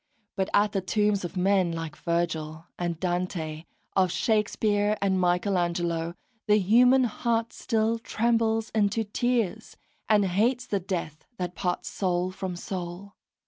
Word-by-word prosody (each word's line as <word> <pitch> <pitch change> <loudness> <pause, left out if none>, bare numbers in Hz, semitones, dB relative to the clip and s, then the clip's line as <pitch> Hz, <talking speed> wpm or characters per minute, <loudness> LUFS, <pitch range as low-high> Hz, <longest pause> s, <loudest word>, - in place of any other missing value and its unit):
But 190 -2 -1
at 205 0 +3
the 195 -2 -1
tombs 205 +1 +1
of 175 +1 -5
men 185 -1 +3
like 165 -2 -5
Vergil 165 -2 -2
and 170 -2 -2
Dante, 175 -3 -2 0.3
of 185 -2 +3
Shakespeare 210 0 +1
and 190 -1 +1
Michelangelo, 175 -2 0 0.3
the 210 0 +5
human 245 +6 +5
heart 230 0 -1
still 225 0 0
trembles 225 -1 0
into 215 +1 +1
tears, 225 -1 -1 0.3
and 210 -2 +4
hates 230 +7 +1
the 200 - -1
death 170 -5 -4
that 180 -1 -3
parts 180 0 -2
soul 180 -1 -1
from 185 -1 -5
soul. 180 +2 -6
190 Hz, 135 wpm, -27 LUFS, 175-215 Hz, 0.3 s, the